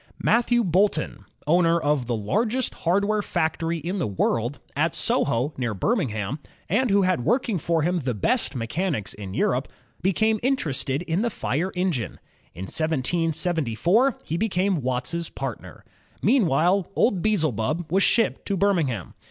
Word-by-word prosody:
Matthew 240 0 +3
Boulton, 185 -2 +1 0.2
owner 170 +2 +3
of 145 -5 0
the 120 - 0
largest 220 - 0
hardware 200 +5 +1
factory 165 -2 -1
in 175 +5 -3
the 170 - 0
world, 115 +6 0 0.2
at 160 +3 +1
Soho 145 -3 0
near 120 -5 -2
Birmingham, 130 - -1 0.3
and 225 +9 +1
who 200 0 +4
had 185 -9 +1
working 235 - +1
for 165 0 0
him 175 +2 +1
the 125 -6 -2
best 225 - 0
mechanics 130 - -2
in 100 -2 -8
Europe, - - +1 0.3
became 215 +5 +2
interested 150 - -1
in 170 +2 -1
the 235 - +1
fire 175 - -2
engine. 170 - -1 0.4
In 90 - -6
1774, 165 - +1
he 165 - -3
became 190 -4 0
Watt's 130 +7 -2
partner. 135 -5 -7 0.4
Meanwhile, 185 - +3
old 200 -7 +2
Beelzebub 155 - 0
was 190 +2 +3
shipped 230 +3 +2
to 200 - 0
Birmingham. 165 - 0
170 Hz, 140 wpm, -24 LUFS, 135-200 Hz, 0.4 s, who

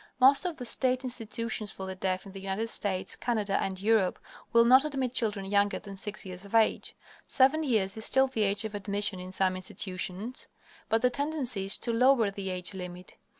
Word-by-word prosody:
Most 275 +7 +6
of 345 -3 -3
the 250 - -6
state 255 +2 +2
institutions 230 -3 -3
for 190 - -7
the 190 - -5
deaf 185 0 -2
in 195 - -10
the 195 - -9
United 195 +4 -3
States, 190 -2 +2
Canada, 210 -5 -1
and 190 -1 -3
Europe 210 -2 +2 0.3
will 235 0 +5
not 260 +3 +7
admit 270 -5 -2
children 210 -5 -1
younger 200 +1 +1
than 200 -2 -10
six 210 +2 -3
years 185 0 -7
of 200 +2 -6
age. 225 -1 +2 0.3
Seven 275 +4 +3
years 215 -9 +1
is 220 - -4
still 265 +3 +4
the 260 -4 -3
age 200 +1 +2
of 215 - -5
admission 205 -1 -1
in 185 +1 -8
some 185 0 +1
institutions, 185 +4 -4 0.4
but 225 +1 +1
the 250 - +4
tendency 275 -8 -2
is 195 - +2
to 235 - -1
lower 240 -3 +4
the 195 -1 -5
age 180 +1 -3
limit. 180 -1 -9
210 Hz, 200 wpm, -29 LUFS, 190-250 Hz, 0.4 s, not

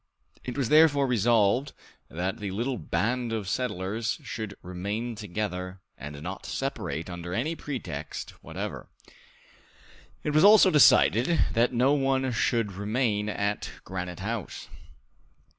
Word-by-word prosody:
It 125 0 -5
was 130 -5 0
therefore 150 -2 +5
resolved 120 +1 +2 0.4
that 90 +4 -3
the 105 -2 -4
little 120 +5 -2
band 120 +2 -1
of 110 -4 -3
settlers 110 -1 -2
should 110 -3 -5
remain 100 +7 -4
together 95 -3 -4 0.2
and 75 0 -8
not 95 +3 -6
separate 80 - -3
under 90 0 -5
any 155 +9 -1
pretext 90 - -6
whatever. - - -6 1.3
It 150 - -1
was 155 +3 +4
also 205 -2 +8
decided 130 +1 +5
that 120 +2 +3
no 130 +3 +3
one 135 -2 +1
should 115 -2 +1
remain 105 +1 -1
at 105 +2 -2
Granite 90 -1 -5
House. 110 -1 -5
110 Hz, 125 wpm, -27 LUFS, 95-125 Hz, 1.3 s, also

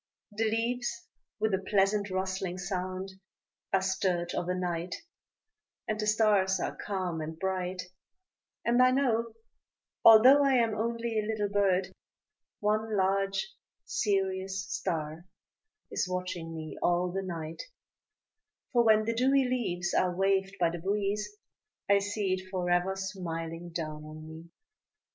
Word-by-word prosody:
The 220 +2 -1
leaves 245 +11 -2 0.3
with 215 -1 +1
a 190 - +2
pleasant 200 0 +2
rustling 190 -1 -2
sound 185 +1 -3 0.6
are 190 -1 +2
stirred 185 -2 0
Of 175 - -2
a 180 - +1
night, 175 -1 -2 0.9
and 215 0 -2
the 215 - -1
stars 210 -3 +3
are - - -2
calm 185 -5 -3
and 160 +1 -5
bright; 185 0 -2 0.8
And 240 +1 +4
I 255 - +7
know, 235 -4 +1 0.7
although 255 +6 +9
I 275 -1 +4
am 230 -3 +3
only 230 +1 -1
a 210 - -2
little 215 -2 -1
bird, 195 -2 +1 0.7
One 215 +1 +1
large 195 - +1 0.4
serious 190 -2 -1
star 165 -1 -3 0.6
is - - -1
watching 180 -3 -4
me 155 -1 -7
all 175 +1 +2
the 195 +2 -2
night, 165 -4 -5 1.1
For 240 -1 +5
when 215 -1 +5
the 230 - 0
dewy 265 +3 +3
leaves 180 -9 -1
are 180 -1 +2
waved 195 +1 +1
by 170 -2 +3
the 170 - -5
breeze, 200 +3 -1 0.6
I 200 0 +5
see 200 -1 -1
it 185 0 -4
forever 180 0 +1
smiling 170 -3 -5
down 155 -2 -5
on 155 +1 -10
me. 160 +1 -11
190 Hz, 135 wpm, -30 LUFS, 180-215 Hz, 1.1 s, although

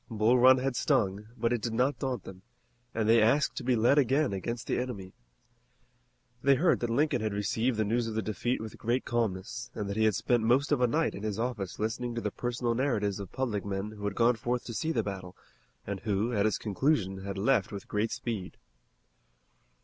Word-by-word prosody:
Bull 115 +2 +3
Run 130 +1 +7
had 130 0 -1
stung, 100 -1 +1
but 115 +1 +1
it 120 - -1
did 115 0 -2
not 125 +2 +1
daunt 130 -2 -2
them 95 -1 -11 0.5
and 110 -1 -1
they 115 0 +6
asked 135 +8 +3
to - - -3
be 125 0 +2
led 120 +6 +4
again 135 -1 +2
against 115 +5 -4
the - - 0
enemy. 100 -7 -5 1.3
They 140 +1 +5
heard 170 +6 +3
that 120 - -2
Lincoln 130 0 +1
had 110 -2 -2
received 110 +4 0
the 110 - +1
news 115 +2 0
of 110 - -4
the 110 - 0
defeat 110 +5 -1
with 110 -1 -8
great 120 +3 0
calmness, 115 +1 -2
and 105 - -3
that 100 +1 -4
he 110 - +3
had 110 -3 +3
spent 120 -2 +1
most 125 +6 +2
of 145 -4 +2
a 125 - +5
night 155 +7 +1
in - - -7
his 105 -1 -3
office 115 -6 -3
listening 120 +2 -2
to 115 - -2
the 105 - -2
personal 120 +1 -2
narratives 110 -6 0
of 100 -3 -7
public 120 -7 -2
men 100 +1 -3
who 105 -1 -10
had 100 -1 -2
gone 120 0 +3
forth 120 +2 -2
to 115 - -7
see 160 +9 -1
the 115 -7 0
battle, 95 -2 -6 0.5
and 100 -1 -4
who 105 +4 -1
at 105 -1 +2
its 110 - 0
conclusion 105 -3 0
had 100 0 -5
left 110 +1 +2
with 100 -2 -7
great 105 +2 0
speed. 115 -5 -4
115 Hz, 220 wpm, -29 LUFS, 105-125 Hz, 1.3 s, Run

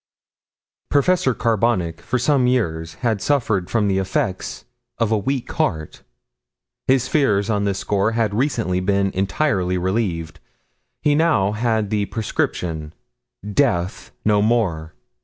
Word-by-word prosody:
Professor 145 -2 +2
Carbonic 115 -7 0
for 125 - -1
some 130 0 +2
years 80 -10 -1
had 110 -4 +1
suffered 110 -10 0
from 110 -3 +1
the 95 -1 +1
effects 95 0 -2 0.3
of 115 -1 0
a 110 - +3
weak 130 +4 -2
heart. 80 -1 -2 0.9
His 130 -1 +3
fears 110 -8 +2
on 100 -1 0
this 100 -1 0
score 100 +3 0
had 110 -3 0
recently 115 -7 0
been 100 +1 +1
entirely 95 -2 0
relieved. 90 -4 -2 0.6
He 150 - +4
now 150 -11 +3
had 110 -1 0
the 105 -2 0
prescription 80 -7 -3 0.5
Death 105 -5 0 0.2
no 105 -1 +4
more! 95 -9 0
105 Hz, 125 wpm, -21 LUFS, 95-120 Hz, 0.9 s, He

